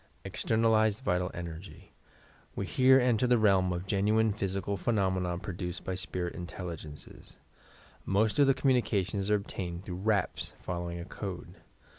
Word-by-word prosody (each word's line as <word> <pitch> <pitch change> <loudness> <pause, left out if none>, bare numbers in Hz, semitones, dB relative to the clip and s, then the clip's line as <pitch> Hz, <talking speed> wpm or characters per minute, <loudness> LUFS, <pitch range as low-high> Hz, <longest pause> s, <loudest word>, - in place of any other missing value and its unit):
EXTERNALIZED 110 +1 +2
VIT41> 90 -3 +1
ENERGT 85 +2 -6 0.9
We - - -2
here 130 +1 +5
enter 125 -1 +2
the 120 0 +4
realm 95 -4 +3
of 90 +1 -3
genuine 105 +2 +2
physical 100 -1 -2
phe 90 - -11
nomena 95 -5 +1
produced 90 -2 -5
by 95 - -3
spirit 90 -1 -3
intelligencea. 85 -4 -8 0.7
Most 105 +7 +1
of 140 - +6
the 135 - +4
communications 105 -7 +1
arc 105 -1 +3
obtained 90 -2 -5
through 90 -2 -5
raps, 100 -1 0
following 85 -1 -4
a 85 - -6
code. 95 -1 -6
95 Hz, 140 wpm, -30 LUFS, 90-110 Hz, 0.9 s, of